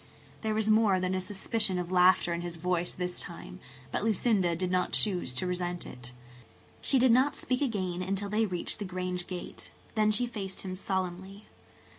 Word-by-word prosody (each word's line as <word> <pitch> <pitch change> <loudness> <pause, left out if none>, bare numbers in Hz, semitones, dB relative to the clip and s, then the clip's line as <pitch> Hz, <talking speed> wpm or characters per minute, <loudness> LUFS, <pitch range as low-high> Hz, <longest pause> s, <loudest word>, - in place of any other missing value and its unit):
There 220 -1 0
was 215 0 +1
more 215 -3 +4
than 185 0 0
a 185 - 0
suspicion 195 0 -1
of 180 0 -3
laughter 180 -1 +5
in 170 - -2
his 175 -1 -5
voice 175 +1 -1
this 180 0 -4
time, - - -7 0.3
but - - -1
Lucinda 205 -5 +2
did 180 +2 -2
not 180 -1 +1
choose 185 -10 +1
to 155 - 0
resent 180 -1 -2
it. 125 0 -9 0.7
She 275 - +4
did 255 -1 +5
not 260 +4 +4
speak 255 +1 -1
again 190 -9 -1
until 195 +2 -1
they 215 +2 +1
reached 180 +2 -3
the 205 - -3
Grange 180 -1 -3
gate. 180 -1 -6 0.2
Then 215 -1 +3
she 215 +3 +3
faced 205 -5 -5
him 185 -1 -4
solemnly. 190 +1 -3
185 Hz, 185 wpm, -30 LUFS, 180-215 Hz, 0.7 s, laughter